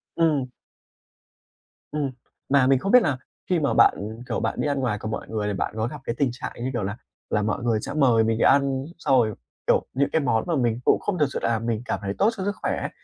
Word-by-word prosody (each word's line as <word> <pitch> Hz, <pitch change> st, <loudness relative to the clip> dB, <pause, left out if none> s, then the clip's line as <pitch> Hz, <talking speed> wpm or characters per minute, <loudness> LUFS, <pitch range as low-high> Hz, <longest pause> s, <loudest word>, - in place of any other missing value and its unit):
Ừm. 150 Hz, -6 st, +2 dB, 1.4 s
Ừm, 145 Hz, -3 st, -1 dB, 0.4 s
mà 140 Hz, -2 st, +4 dB
mình 135 Hz, -1 st, +4 dB
không 195 Hz, -, -2 dB
biết 250 Hz, -, +8 dB
là 140 Hz, -, 0 dB, 0.3 s
khi 180 Hz, -, +3 dB
mà 145 Hz, -3 st, +1 dB
bạn, -, -, +6 dB, 0.3 s
kiểu, 115 Hz, -, -1 dB
bạn -, -, -1 dB
đi -, -, 0 dB
ăn 140 Hz, -1 st, 0 dB
ngoài 125 Hz, -5 st, 0 dB
cùng 110 Hz, 0 st, -5 dB
mọi -, -, -4 dB
người, 105 Hz, -2 st, -2 dB
thì 105 Hz, -, -1 dB
bạn 95 Hz, -, -2 dB
có 110 Hz, +1 st, 0 dB
gặp 145 Hz, +1 st, -8 dB
cái 115 Hz, -, -3 dB
tình 140 Hz, -2 st, +2 dB
trạng, 130 Hz, +5 st, -6 dB
như 130 Hz, -, -1 dB
kiểu 115 Hz, -, -1 dB
là 100 Hz, +3 st, -3 dB, 0.3 s
là, 105 Hz, -, +1 dB
mọi 110 Hz, +2 st, -1 dB
người 115 Hz, -3 st, +1 dB
sẽ -, -, -5 dB
mời 125 Hz, -7 st, +4 dB
mình 110 Hz, 0 st, +1 dB
đi -, -, +1 dB
ăn, 135 Hz, -1 st, +3 dB
xong 135 Hz, -5 st, +2 dB
rồi, 110 Hz, -3 st, +2 dB, 0.3 s
kiểu, -, -, +3 dB
những 140 Hz, +2 st, +1 dB
cái 160 Hz, -, +2 dB
món 115 Hz, -5 st, +1 dB
mà 170 Hz, -, +1 dB
mình 120 Hz, -4 st, +1 dB
cũng -, -, +4 dB
không 190 Hz, -4 st, -2 dB
thực 150 Hz, -, +5 dB
sự -, -, -2 dB
là 115 Hz, -1 st, +1 dB
mình 115 Hz, -1 st, -2 dB
cảm -, -, -2 dB
thấy 100 Hz, 0 st, -2 dB
tốt 205 Hz, -, +4 dB
cho 190 Hz, -, -3 dB
sức 205 Hz, 0 st, -1 dB
khỏe -, -, -1 dB
ấy -, -, -3 dB
130 Hz, 260 wpm, -24 LUFS, 115-145 Hz, 1.4 s, biết